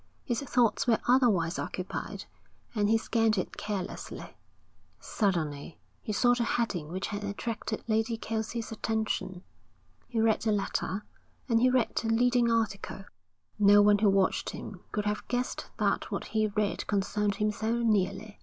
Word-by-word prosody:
His 240 -1 -1
thoughts 250 -1 +2
were 230 -2 +5
otherwise 220 -10 +3
occupied, 185 0 -5 0.5
and 210 -2 +1
he 225 - +5
scanned 225 -1 +1
it 185 - -2
carelessly. 200 -3 -5 0.6
Suddenly 165 -8 -2 0.2
he - - -4
saw 245 +4 +4
the 245 -1 0
heading 215 -9 -1
which 185 +4 -3
had 205 0 -4
attracted 215 +2 -4
Lady 225 +1 +1
Kelsey's 225 +1 -3
attention. 220 -4 -2 0.6
He 235 - -2
read 220 -1 +3
the 220 - +1
letter, 200 0 -1 0.4
and 230 -3 +3
he 255 - +5
read 250 -3 +1
the 225 - 0
leading 240 +1 +3
article. 205 -3 -1 0.6
No 205 0 +7
one 205 0 +5
who 210 -1 +4
watched 195 -1 +2
him 195 - -7
could 210 -1 -2
have 210 0 -2
guessed 245 +1 -2
that - - 0
what - - -3
he 215 -1 +1
read 210 -1 -1
concerned 205 0 0
him 210 +1 +1
so 220 +2 -2
nearly. 210 -2 0
215 Hz, 155 wpm, -29 LUFS, 200-230 Hz, 0.6 s, No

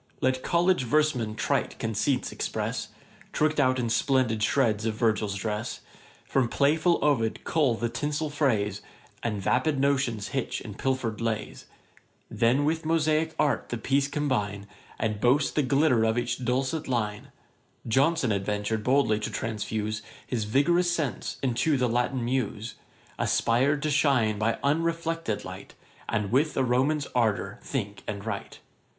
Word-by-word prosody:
Let 130 0 +1
college 175 -2 +2
verse 155 +5 +3
men 110 -4 -3
trite 110 0 -1
conceits 115 +4 -1
express, - - -3 0.5
Trick'd 155 0 +1
out 130 -2 +3
in 120 -2 -1
splendid 120 -2 +1
shreds 110 -2 +2
of 110 - -1
Virgil's 110 -3 +1
dress; 105 +3 -3 0.4
From 130 -3 +1
playful 155 +6 +3
Ovid 125 -7 +1
cull 145 -7 +2
the 120 +1 -1
tinsel 145 +6 -2
phrase, 110 -9 0 0.4
And 110 -3 -2
vapid 130 +8 +1
notions 130 -7 +1
hitch 135 -2 -2
in 105 - -8
pilfer'd 120 -2 -2
lays: 110 -2 -3 0.6
Then 125 +5 +2
with 160 +2 0
mosaick 160 0 +1
art 140 -5 +1
the 120 - -2
piece 135 +4 +1
combine, 120 -9 -1 0.3
And 110 -2 -2
boast 135 +4 +3
the 150 - +2
glitter 135 -3 +3
of 110 +1 +1
each 120 +1 -2
dulcet 135 +6 -1
line: 105 -5 -2 0.6
Johnson 135 +2 +2
adventur'd 105 +2 -1
boldly 130 -4 +3
to 110 - -3
transfuse 110 -1 -3 0.2
His 115 -4 -2
vigorous 170 +10 +3
sense 155 -7 -2
into 135 +4 +1
the 125 -1 +2
Latian 120 +1 0
muse; 115 -3 -2 0.5
Aspir'd 135 +5 +2
to 155 - 0
shine 130 -8 +2
by 115 +2 +1
unreflected 165 -4 -1
light, - - -9 0.3
And 105 -1 -1
with 140 +4 +2
a 135 - +3
Roman's 135 +4 +1
ardour 105 -4 0
think 105 -7 -4
and 100 0 -5
write. 105 -3 -5
125 Hz, 145 wpm, -27 LUFS, 110-145 Hz, 0.6 s, verse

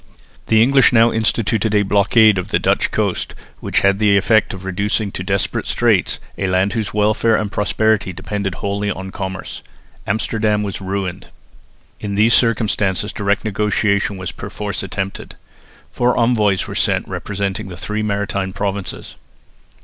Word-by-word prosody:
The 110 0 +5
English 135 +2 +5
now 115 -1 +5
instituted 110 -1 0
a 105 - +4
blockade 105 +1 +4
of 90 - -4
the - - +1
Dutch - - +1
coast, - - -2 0.2
which - - 0
had 100 0 +3
the 105 -2 +4
effect 110 +2 +3
of 95 0 -8
reducing 100 +2 -1
to - - -6
desperate 95 -5 -1
straits - - +1 0.2
a 95 - 0
land 95 +2 +1
whose 110 -3 -2
welfare 110 +2 +2
and 105 -2 -2
prosperity 105 -1 +1
depended 95 +1 -4
wholly 100 +1 -2
on 95 0 -5
commerce. 95 0 -6 0.5
Amsterdam 110 0 0
was 100 -1 -5
ruined. 95 -1 -4 0.7
In 100 -1 -4
these 110 +3 +4
circumstances 105 -3 +1
direct 100 +1 -1
negotiation 105 -1 0
was 95 -1 -5
perforce 105 -3 -5
attempted. 95 +1 -5 0.6
Four 120 0 +1
envoys 110 -5 +2
were - - -6
sent - - 0
representing 100 -1 -4
the 90 -2 -9
three 105 +5 -3
maritime 100 -2 -2
provinces. 100 -1 -4
100 Hz, 150 wpm, -18 LUFS, 95-110 Hz, 0.7 s, The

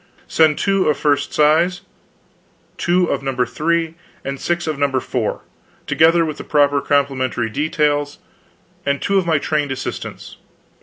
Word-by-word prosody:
Pxxp. - - -20
Send 155 -2 +4
two 195 -4 +1
of 150 - +1
first 145 -1 +1
size, 165 +4 +3 1.0
two 180 +1 +2
of - - -1
No. 135 -1 -3
3, 160 +6 -1 0.3
and 140 0 -4
six 175 0 -1
of 155 -3 -3
No. 140 -2 +1
4, 125 -3 -3 0.4
together 165 +1 +4
with 155 -2 -4
the - - -6
proper 145 -1 +2
complementary 130 -5 0
details 145 +1 0 0.7
and 140 0 0
two 200 -1 +2
of 180 - -3
my 160 -2 +3
trained 145 -1 -1
assistants." 135 0 -6
150 Hz, 150 wpm, -19 LUFS, 140-165 Hz, 1.0 s, Send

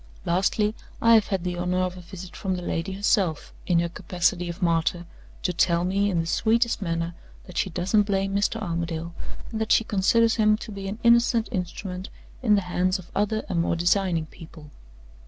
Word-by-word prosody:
Lastly, 195 +4 +1 0.3
I 230 0 +5
have 220 -3 +5
had 190 -3 -1
the 180 -1 -3
honor 180 +1 0
of 185 0 -1
a 180 - -9
visit 180 +1 -10
from 190 -3 -2
the 180 - -5
lady 175 +3 -2
herself, 190 -5 0
in 175 - +3
her 170 - 0
capacity 175 0 -1
of 170 - -6
martyr, 170 -1 +1 0.4
to 180 - 0
tell 170 0 +2
me, 200 +3 +1
in 175 -4 0
the - - -4
sweetest 230 +6 +1
manner, 165 -2 -2 0.3
that 180 - -12
she 195 - 0
doesn't 185 +5 +2
blame 195 -1 0
Mr. 205 +2 +1
Armadale, 170 -3 -3 0.4
and 220 -1 -3
that 220 - -1
she - - +5
considers 225 +3 +2
him 215 -1 +4
to 220 - -8
be 195 -1 -6
an 200 +2 -4
innocent 235 -1 +4
instrument 180 -1 -4 0.3
in 220 -5 +4
the 200 - +2
hands 185 +1 0
of 185 -2 -13
other 210 +2 0
and 170 -3 0
more 170 - 0
designing 175 -1 +1
people. 155 -2 -13
185 Hz, 195 wpm, -25 LUFS, 170-210 Hz, 0.4 s, I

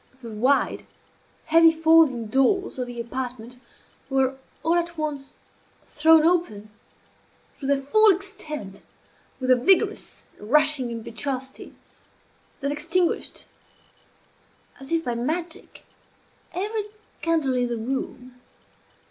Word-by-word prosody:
The 235 -3 -9
wide, 255 +7 +1 0.6
heavy 330 +1 +6
folding 320 -7 +4
doors 270 - +1
of 250 - -2
the 240 -1 -8
apartment 245 0 -6 0.5
were 265 -1 +1 0.3
all 325 - +2
at 340 -1 -1
once 290 -3 -4 0.5
thrown 320 +1 +5
open, 270 - 0 0.9
to 275 - -5
their 275 -1 +1
full 430 +10 +5
extent, 310 - -3 0.6
with 255 -1 +1
a - - +8
vigorous 370 +10 +1 0.2
and 210 - -11
rushing 300 -3 +4
impetuosity 250 +3 -6 0.9
that 280 +1 -1
extinguished, 330 +4 -1 1.3
as 270 +3 -6
if 330 -1 +1
by 245 - -1
magic, 320 +8 -4 0.7
every 415 +4 -3 0.4
candle 320 -5 +1
in 250 -1 +1
the 240 -1 -3
room. 250 +1 -5
275 Hz, 110 wpm, -24 LUFS, 250-330 Hz, 1.3 s, a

